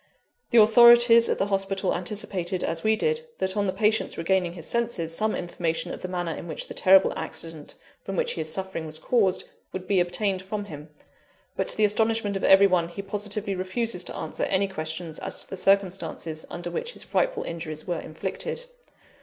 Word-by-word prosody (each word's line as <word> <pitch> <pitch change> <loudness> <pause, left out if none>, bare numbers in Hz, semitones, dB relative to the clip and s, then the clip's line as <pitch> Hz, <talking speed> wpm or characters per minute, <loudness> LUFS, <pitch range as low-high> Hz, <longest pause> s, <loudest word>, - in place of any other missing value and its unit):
The 240 - +2
authorities 235 +1 +7
at - - +1
the 195 - +1
hospital 195 -1 -1
anticipated, 185 -1 -3
as 165 0 -2
we 220 0 +3
did, 465 - 0 0.2
that, 190 +1 -1
on 205 -1 0
the - - +1
patient's 215 +2 0
regaining 175 0 0
his 165 -3 -9
senses, 230 -9 -1
some 215 +3 +1
information 170 -2 -3
of - - -8
the 185 - -4
manner 175 -2 -3
in - - -8
which 160 - -4
the - - -8
terrible 190 +1 +5
accident 160 -3 -6 0.3
from 195 - -5
which - - 0
he 165 - -3
is 155 0 -4
suffering 190 -4 -4
was 155 0 -4
caused, 195 +1 +1 0.3
would 185 0 -7
be 195 -2 +2
obtained 185 +2 0
from 205 +2 -5
him. 150 -4 -10 0.7
But, - - -1
to - - 0
the 215 - +4
astonishment 220 0 +1
of 195 - -3
every 195 +1 +7
one, 180 -3 +2
he 200 +3 -7
positively 205 0 -2
refuses 185 +1 -1
to - - -6
answer - - -3
any 195 +1 +1
questions 160 -2 -4
as - - -4
to - - -16
the - - -3
circumstances 180 -5 0
under 175 0 -6
which 475 - -4
his - - -7
frightful - - 0
injuries 160 -2 -6
were 175 -3 -2
inflicted. 190 - -4
190 Hz, 195 wpm, -25 LUFS, 170-210 Hz, 0.7 s, authorities